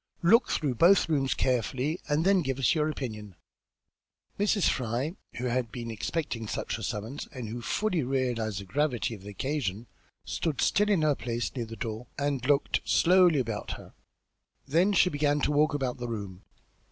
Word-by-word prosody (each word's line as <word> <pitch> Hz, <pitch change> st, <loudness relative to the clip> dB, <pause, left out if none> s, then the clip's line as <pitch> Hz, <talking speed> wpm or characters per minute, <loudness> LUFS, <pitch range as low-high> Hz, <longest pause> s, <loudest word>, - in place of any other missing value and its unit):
Look 230 Hz, +8 st, +5 dB
through 145 Hz, -4 st, 0 dB
both 175 Hz, +10 st, +5 dB
rooms 135 Hz, -4 st, +1 dB
carefully, 130 Hz, -, 0 dB
and 150 Hz, +3 st, +1 dB
then 195 Hz, -1 st, +4 dB
give 135 Hz, -4 st, -2 dB
us 135 Hz, -, +3 dB
your 155 Hz, -1 st, +1 dB
opinion." 110 Hz, -, -6 dB, 1.0 s
Mrs. 205 Hz, -2 st, +3 dB
Fry, 125 Hz, -, -1 dB, 0.2 s
who 120 Hz, +2 st, -4 dB
had 125 Hz, -2 st, -1 dB
been 115 Hz, 0 st, -5 dB
expecting 115 Hz, 0 st, -3 dB
just -, -, -4 dB
such -, -, -3 dB
a -, -, -8 dB
summons 110 Hz, +6 st, -4 dB
and 125 Hz, -6 st, -6 dB
who 120 Hz, +2 st, -5 dB
fully 185 Hz, -, 0 dB
realised 120 Hz, -6 st, -1 dB
the 100 Hz, -, -8 dB
gravity 130 Hz, +1 st, 0 dB
of 105 Hz, -, -9 dB
the 100 Hz, -, -9 dB
occasion, 115 Hz, -2 st, -3 dB, 0.4 s
stood 155 Hz, -5 st, -2 dB
still 210 Hz, +1 st, +3 dB
in 190 Hz, -7 st, +3 dB
her 150 Hz, -1 st, +4 dB
place 120 Hz, -1 st, -3 dB
near 120 Hz, -3 st, -2 dB
the 115 Hz, -, -8 dB
door 115 Hz, +1 st, -5 dB
and 140 Hz, -3 st, -1 dB
looked 145 Hz, -1 st, +2 dB
slowly 180 Hz, -2 st, +5 dB
about 115 Hz, -4 st, -3 dB
her; -, -, -11 dB, 0.7 s
then 170 Hz, +8 st, +3 dB
she 180 Hz, -1 st, +4 dB
began 145 Hz, 0 st, +1 dB
to -, -, +1 dB
walk 150 Hz, +1 st, +3 dB
about 130 Hz, -3 st, -2 dB
the 120 Hz, -, -4 dB
room. 100 Hz, -5 st, -6 dB
130 Hz, 180 wpm, -28 LUFS, 115-155 Hz, 1.0 s, Look